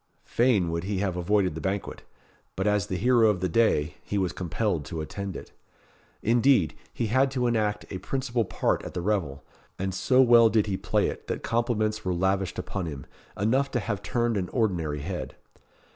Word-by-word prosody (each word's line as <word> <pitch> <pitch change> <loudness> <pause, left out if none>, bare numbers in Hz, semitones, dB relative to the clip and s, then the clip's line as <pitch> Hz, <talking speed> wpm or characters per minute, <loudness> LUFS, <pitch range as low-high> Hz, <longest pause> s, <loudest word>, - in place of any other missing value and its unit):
Fain 110 -9 +2
would 85 +1 -3
he 100 0 -2
have 95 -2 -1
avoided 95 0 +1
the 80 - -6
banquet 95 +1 -3 0.5
but 95 - -2
as 105 -3 +1
the 95 - -2
hero 120 +1 +4
of 100 -4 0
the 90 - 0
day, 80 -7 +2
he 105 - -3
was 95 -3 0
compelled 90 -1 -2
to 80 - -5
attend 95 +4 -5
it. - - -9 0.7
Indeed, 120 - +3 0.2
he 115 - -2
had 130 +5 +3
to 130 -2 -1
enact 110 -3 0
a 95 - -4
principal 125 -2 -1
part 95 - 0
at - - -8
the 90 - -2
revel; 85 -8 -1 0.3
and 95 0 -2
so 110 +7 +2
well 120 -3 +7
did 110 -1 +2
he 100 -2 -2
play - - 0
it - - -6
that - - -4
compliments 110 -2 0
were 90 -1 -1
lavished 95 +1 0
upon 90 -1 -4
him, 70 -4 -7 0.3
enough 130 +8 +1
to 125 - -1
have 105 -2 -3
turned 115 +4 0
an 90 -2 -2
ordinary 85 - -1
head. - - -5
100 Hz, 190 wpm, -27 LUFS, 90-115 Hz, 0.7 s, well